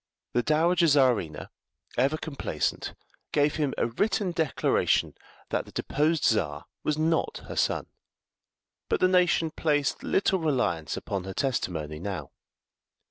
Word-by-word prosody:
The 120 - +3
Dowager 165 +5 +3
Czarina, 125 - +2 0.4
ever 135 +5 +2
complacent, 155 -4 -3 0.4
gave 145 +1 +2
him 145 -4 0
a - - +2
written 190 - 0
declaration 160 -8 +1 0.4
that - - -1
the - - -14
deposed 150 +1 0
Czar 75 -10 +1 0.2
was 150 - 0
not 160 +1 0
her - - -6
son; - - +1 1.0
but - - +1
the 185 - +5
nation 180 -3 +3
placed 145 -3 0
little 190 -1 +1
reliance 120 - 0
upon 95 -3 -4
her 95 -1 -6
testimony 80 - -2
now. 95 -1 -5
145 Hz, 130 wpm, -27 LUFS, 105-160 Hz, 1.0 s, the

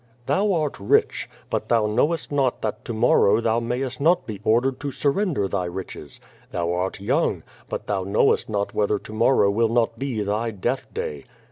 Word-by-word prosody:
'Thou 200 +8 +2
art 155 -5 -1
rich. 100 - +1 0.2
But - - -2
thou 115 -2 +3
knowest 145 +11 0
not 135 -3 0
that 110 +2 -3
to - - -4
morrow 110 -2 +4
thou 115 0 +1
mayest 125 +2 -3
not 175 +4 +3
be 105 -3 -7
ordered 120 +5 +2
to 145 - -3
surrender 145 - 0
thy 95 -2 -1
riches. 85 -5 -7 0.3
Thou 85 0 -1
art 90 +2 -2
young. 105 - 0 0.3
But - - -4
thou 100 -2 -1
knowest 100 +4 +2
not 100 -1 -1
whether 105 0 +1
to 110 - -10
morrow 110 -2 +4
will 115 +2 +2
not 115 0 +1
be 130 -6 -2
thy 105 +3 -1
death 115 +5 -3
day. 465 +1 -5
115 Hz, 180 wpm, -23 LUFS, 100-135 Hz, 0.3 s, morrow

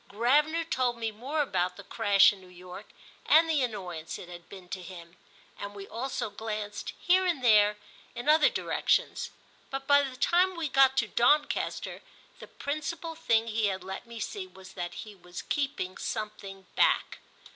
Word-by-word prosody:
Gravener 295 +10 +2
told 250 -5 0
me 225 -1 -2
more 270 +8 -1
about 180 -7 -1
the - - -9
crash 205 -3 +5
in 195 - -14
New 185 - -15
York 180 0 -11 0.4
and 325 +1 +6
the 310 -3 +2
annoyance 180 -9 -4
it 175 - -10
had 175 -1 -11
been 190 -2 -11
to 190 0 -5
him, 170 -1 -11 0.4
and 205 0 -6
we 195 -1 -8
also 235 -1 -3
glanced 210 -1 -5
here 370 +1 +4
and 320 -8 -1
there 210 -3 +5 0.4
in 240 +4 -6
other 305 0 +6
directions; - - 0 0.4
but 270 0 -5
by 285 0 +6
the 270 -2 -4
time 360 +6 +3
we 330 -2 -1
got 270 0 +5
to 235 - +2
Doncaster 290 +7 +1 0.4
the - - -10
principal 315 +3 -4
thing 230 -9 +2
he 220 -1 0
had 190 -2 -3
let 190 +5 -7
me 235 -1 -8
see 375 - -4
was 190 - -14
that 175 -1 -5
he 215 - -11
was 180 -2 -9
keeping 270 -10 -2
something 200 -3 -5
back. - - +2
225 Hz, 175 wpm, -29 LUFS, 195-285 Hz, 0.4 s, and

